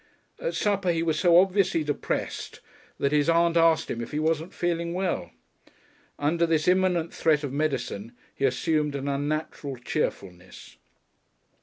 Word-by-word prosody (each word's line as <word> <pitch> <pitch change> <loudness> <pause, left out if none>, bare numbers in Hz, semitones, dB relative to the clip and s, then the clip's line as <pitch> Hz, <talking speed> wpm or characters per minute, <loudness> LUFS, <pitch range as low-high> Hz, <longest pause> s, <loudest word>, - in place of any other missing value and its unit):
At - - -3
supper 200 -3 0
he 165 -1 0
was 160 -2 0
so 175 +1 +6
visibly 190 -4 +1
depressed 145 -1 -3 0.4
that 140 - 0
his 150 +1 +2
aunt 170 0 +3
asked 165 -1 +3
him 120 - -3
if 115 - -6
he 150 - -4
wasn't 160 +2 0
feeling 170 0 -2
well. 180 - -2 0.9
Under 165 +4 +1
this 160 -2 +1
imminent 180 -2 +2
threat 155 -2 +2
of 140 -2 -4
medicine 125 -7 -2 0.2
he 140 - -1
assumed 150 +2 0
an 140 0 -4
unnatural 145 0 -3
cheerfulness. 95 - -5
160 Hz, 145 wpm, -26 LUFS, 145-170 Hz, 0.9 s, so